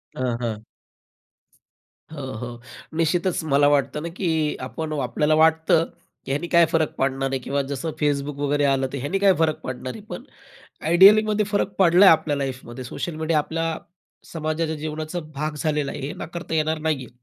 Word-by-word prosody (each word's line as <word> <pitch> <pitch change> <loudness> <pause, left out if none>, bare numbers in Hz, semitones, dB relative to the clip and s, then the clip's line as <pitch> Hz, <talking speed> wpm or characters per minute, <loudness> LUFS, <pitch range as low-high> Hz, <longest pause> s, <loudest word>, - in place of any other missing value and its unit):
हां, 125 -2 -1
हां. 110 -3 -3 1.5
हो, 135 -4 -6
हो. 120 0 -7 0.4
निश्चितच 170 +1 +1
मला 145 +1 +5
वाटतं 145 +1 0
ना 170 - -4
की 185 - 0 0.4
आपण 160 -1 -5
आपल्याला 150 +5 +1
वाटतं, 160 +1 +4 0.4
की - - -4
ह्यानी 150 +5 -1
काय 170 -1 +7
फरक 160 -2 +1
पडणार 135 0 0
आहे 135 - -1
किंवा 140 +3 -1
जसं 160 +4 -3
Facebook 145 -1 -1
वगैरे 145 +1 +1
आलं 135 -1 +1
तर - - -2
ह्याने 145 +9 -2
काय 195 -1 +5
फरक 160 -1 +1
पडणार 130 0 -5
आहे? - - -10
पण - - -6 0.6
आयडियलीमध्ये 210 +4 +6
फरक 205 -1 -1
पडला 180 +1 +6
आहे - - +9
आपल्या 150 -2 -2
लाईफमध्ये. 130 -2 -5
सोशल 155 +6 -5
मीडिया 160 0 0
आपल्या 165 +1 -2 0.6
समाजाच्या 160 0 -2
जीवनाचा 155 +2 -4 0.2
भाग 150 +2 -3
झालेला 150 0 -1
आहे, - - -7
हे - - -5
नाकारता 170 0 -7
येणार 155 0 0
नाहीये. 150 -5 -2
155 Hz, 165 wpm, -23 LUFS, 140-165 Hz, 1.5 s, आहे